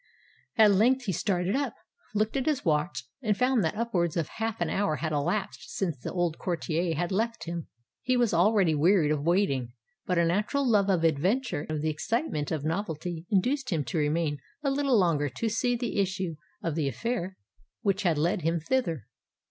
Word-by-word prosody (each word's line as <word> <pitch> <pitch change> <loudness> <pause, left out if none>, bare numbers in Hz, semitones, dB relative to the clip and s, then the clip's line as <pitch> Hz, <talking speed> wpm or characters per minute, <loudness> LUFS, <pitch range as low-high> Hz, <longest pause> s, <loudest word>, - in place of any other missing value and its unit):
At 215 -2 +7
length 245 +7 +3
he 195 - 0
started 185 +2 0
up, 275 -5 -1 0.4
looked 215 +3 +1
at 265 0 -1
his 300 -4 0
watch, 150 -6 0 0.2
and 215 -5 +1
found 250 -3 +3
that 160 - 0
upwards 180 -9 0
of 165 -3 -1
half 225 -1 -2
an 175 - 0
hour 195 -2 0
had 160 +1 -3
elapsed 175 +7 -2
since 175 -6 -1
the 125 - -6
old 175 -3 -1
courtier 170 -1 -1
had 175 +4 -1
left 225 -1 -1
him. 170 -1 -5 0.3
He 255 0 +1
was 240 -5 +2
already 185 -1 +4
wearied 155 +1 +3
of 150 -2 0
waiting; 145 -8 +1 0.3
but 180 - +1
a 170 - +4
natural 210 - +1
love 205 -4 +3
of 180 -4 +2
adventure 170 - +1
and - - -2
of 150 - -2
the 155 - +1
excitement 155 - -2
of 155 -3 -2
novelty 165 -1 -3
induced 255 +7 +1
him 160 -6 0
to 140 +5 -2
remain 150 0 0 0.2
a 275 - +1
little 275 -3 +2
longer 160 -7 +2
to 225 - -2
see 245 +3 +1
the 235 -3 -2
issue 185 -3 -1 0.3
of 165 - -1
the 150 -2 0
affair 190 - -3 0.5
which 200 -1 +1
had 170 -6 +2
led 175 +6 +1
him 165 +2 +1
thither. 165 - -1
180 Hz, 195 wpm, -28 LUFS, 160-220 Hz, 0.5 s, At